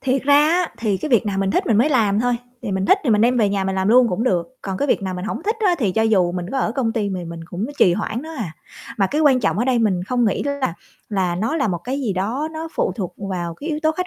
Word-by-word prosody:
Thiệt 260 0 0
ra 285 +1 +4
á 350 0 +1
thì 210 -4 0
cái 305 - -4
việc 235 -4 +3
nào 195 -1 -1
mình 195 0 +1
thích - - 0
mình 220 - +3
mới 275 +6 +4
làm 215 -7 +2
thôi, 245 0 +1 0.3
thì 205 -5 -3
mình 190 0 -1
thích 390 - +5
thì 245 - +2
mình 210 -1 +4
đem 245 +3 +3
về 210 -3 +3
nhà 195 -1 -1
mình 190 - -1
làm 190 +1 0
luôn 245 +1 +6
cũng 195 +4 -1
được. 255 +3 -1
Còn 190 -1 -3
cái 285 - 0
việc - - +2
nào 185 -1 -3
mình 180 - -5
hổng 220 - -4
thích 435 +5 -1
á 360 - +4
thì 210 -8 0
cho 220 - +1
dù 190 -6 +2
mình 180 -1 -4
có 270 - 0
ở 225 - 0
công 245 -4 -1
ty 210 -4 -1
mì 185 -2 -4
mình 170 0 -7
cũng 180 +6 -4
trì 180 - +5
hoãn 215 +6 -3
nữa 320 +1 -8
à. 170 -9 -4 0.4
Mà 195 - +3
cái 295 +9 -1
quan 270 -5 +4
trọng - - 0
ở 240 - +1
đây 255 -2 +2
mình 200 -6 +1
không 245 +2 0
nghĩ 210 - 0
là 280 -10 -2 0.3
là 190 -4 0
nó 225 - -1
là 275 -8 +1
một 175 - -1
cái 270 +3 -2
gì 230 -7 -1
đó 225 +11 -2
nó 320 +1 -6
phụ - - 0
thuộc 180 -2 -5
vào 180 -4 -4
cái 300 - -7
yếu 300 - -2
tố 315 - +3
khách 365 +3 -3
220 Hz, 315 wpm, -21 LUFS, 190-265 Hz, 0.4 s, luôn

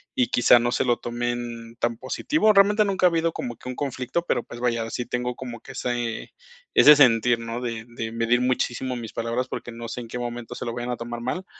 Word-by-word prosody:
y 125 - +2
quizá 120 0 +5
no 120 +1 0
se - - +1
lo 120 -2 +2
tomen 120 -1 -4
tan 120 -1 0
positivo. 215 - +1
Realmente 205 +1 +5
nunca 195 -2 +1
ha - - +7
habido 165 0 +1
como 120 -5 -5
que 125 - -9
un 125 - -5
conflicto, 135 +4 -2
pero, 120 -7 0
pues 120 0 -10
vaya, 115 -2 -1
sí 125 - -3
tengo 125 0 -2
como 120 -3 -8
que 135 - -11
ese 120 -3 -3 0.4
ese 150 0 +8
sentir, 120 -3 +5
¿no?, 115 +1 -5
de 115 -2 -4
de 115 -1 -5
medir 115 +2 +1
muchísimo 125 0 -1
mis 115 -2 -7
palabras 115 +2 -2
porque 120 - -6
no 115 0 -7
sé 120 +2 -5
en 115 - -10
qué 125 - -5
momento 120 -1 -5
se - - -6
lo 115 - -3
vayan 120 +1 -4
a 120 - -3
tomar 120 0 -6
mal 180 +10 -3
120 Hz, 235 wpm, -24 LUFS, 115-130 Hz, 0.4 s, ese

